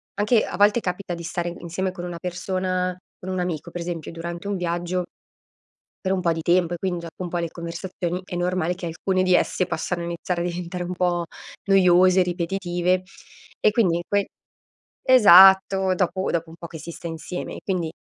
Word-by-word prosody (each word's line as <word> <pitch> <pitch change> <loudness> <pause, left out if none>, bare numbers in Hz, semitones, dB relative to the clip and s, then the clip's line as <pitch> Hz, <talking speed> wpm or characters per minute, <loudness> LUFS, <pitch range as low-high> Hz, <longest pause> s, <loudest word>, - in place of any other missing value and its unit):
anche 215 +2 +2
a - - -6
volte 205 +3 +5
capita 180 -2 -4
di 170 - -6
stare 175 +1 -3
insieme 185 +2 -3
con 180 -1 -7
una 175 -1 -5
persona, 185 +1 -2 0.2
con 185 - -7
un 185 -1 -2
amico 175 -4 -3
per 175 - -6
esempio 170 -2 -5
durante 170 +3 -6
un 205 - -1
viaggio 175 +1 -2 1.0
per 190 - +2
un 185 - -1
po' 170 -1 +2
di 160 -1 -5
tempo 175 0 +2
e - - -7
quindi 180 -1 -2
gia 170 -1 -7
un 180 -2 -4
po' 175 - -2
le 170 -1 -2
conversazioni 175 +1 -5
è 180 - -6
normale 180 0 0
che 180 -1 -7
alcune 185 +3 0
di 185 - +3
esse 180 +1 +2
possano 175 -1 -3
iniziare 170 +1 -3
a - - -1
diventare 180 +1 -4
un 180 +1 -4
po' 175 -1 0 0.4
noiose, 185 -1 +5
ripetitive, 180 0 0 0.6
e 215 - +4
quindi 195 -7 +2
in - - -3
quei 200 0 +2 0.8
esatto 190 -5 +7
dopo 185 +1 -1
dopo 165 -1 -2
un 165 - -12
po' 170 - -7
che 160 - -10
si 165 +3 -8
sta 170 - -9
insieme 165 +2 -5
e - - -8
quindi, 175 -5 -1
180 Hz, 195 wpm, -23 LUFS, 170-185 Hz, 1.0 s, esatto